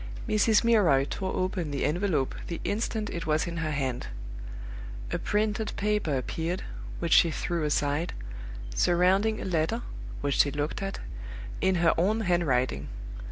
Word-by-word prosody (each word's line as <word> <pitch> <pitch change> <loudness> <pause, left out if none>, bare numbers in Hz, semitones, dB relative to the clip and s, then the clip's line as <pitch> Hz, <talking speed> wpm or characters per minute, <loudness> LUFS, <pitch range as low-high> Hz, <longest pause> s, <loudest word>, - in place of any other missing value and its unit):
Mrs. 215 +1 +4
Milroy 195 -13 +5
tore 190 -1 -3
open 185 -3 -1
the 140 -1 -1
envelope 165 -4 +1
the 170 - -4
instant 215 0 -1
it 170 -1 -4
was 155 0 +2
in 170 -1 -4
her 165 -1 -1
hand. 135 -4 -1 1.0
A - - 0
printed 215 +1 0
paper 205 -9 +1
appeared 165 +7 -2 0.3
(which 170 -1 +1
she 170 - +7
threw 170 +1 -1
aside), 150 +3 +1 0.6
surrounding 185 +5 +3
a - - -4
letter 185 +6 0 0.4
(which 140 -1 0
she 145 - +6
looked 145 +5 -2
at) 195 0 -3 0.6
in 190 0 +3
her 170 -1 +4
own 210 +6 +2
handwriting! 165 - +1
175 Hz, 145 wpm, -28 LUFS, 150-205 Hz, 1.0 s, she